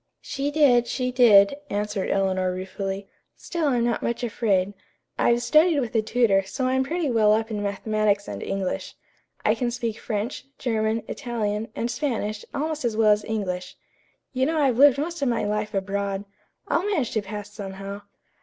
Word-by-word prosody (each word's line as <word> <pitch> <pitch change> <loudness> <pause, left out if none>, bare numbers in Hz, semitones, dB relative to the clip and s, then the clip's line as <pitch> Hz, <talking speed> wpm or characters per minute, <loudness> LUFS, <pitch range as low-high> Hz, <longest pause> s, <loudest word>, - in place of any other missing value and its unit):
"She 275 +1 -2
did, 270 -6 +4
she 250 0 -1
did," 235 -2 +6
answered 205 -1 -2
Eleanor 190 -1 +1
ruefully. 195 +1 -4 0.3
"Still 335 -4 -2
I'm 245 -4 +2
not 240 -1 0
much 235 +1 -2
afraid. 205 -5 +1 0.5
I've 240 0 +3
studied 310 +2 +4
with 240 -3 -3
a 225 - +3
tutor, 215 -3 +3
so 255 +7 -3
I'm 260 +1 +2
pretty 315 0 -1
well 215 -3 +4
up 225 +1 0
in 210 -1 -2
mathematics 205 0 0
and - - -6
English. 195 -2 -3 0.5
I - - +5
can 245 -2 -1
speak 235 -2 -3
French, 220 +6 -3
German, 220 -2 0
Italian 220 -4 -2
and 235 +1 -2
Spanish 225 -5 -2
almost 305 +1 -2
as 230 -3 -1
well 220 -1 +5
as 210 0 +2
English. 185 -5 -3 0.6
You 260 +1 +1
know 320 0 0
I've 260 -5 +2
lived 280 -1 +7
most 335 +2 -3
of 275 - +2
my 230 -3 0
life 210 +1 -1
abroad. 200 0 -2 0.4
I'll 335 - +1
manage 370 - 0
to 220 - 0
pass 205 0 -7
somehow." 195 0 -7
220 Hz, 175 wpm, -25 LUFS, 200-255 Hz, 0.6 s, lived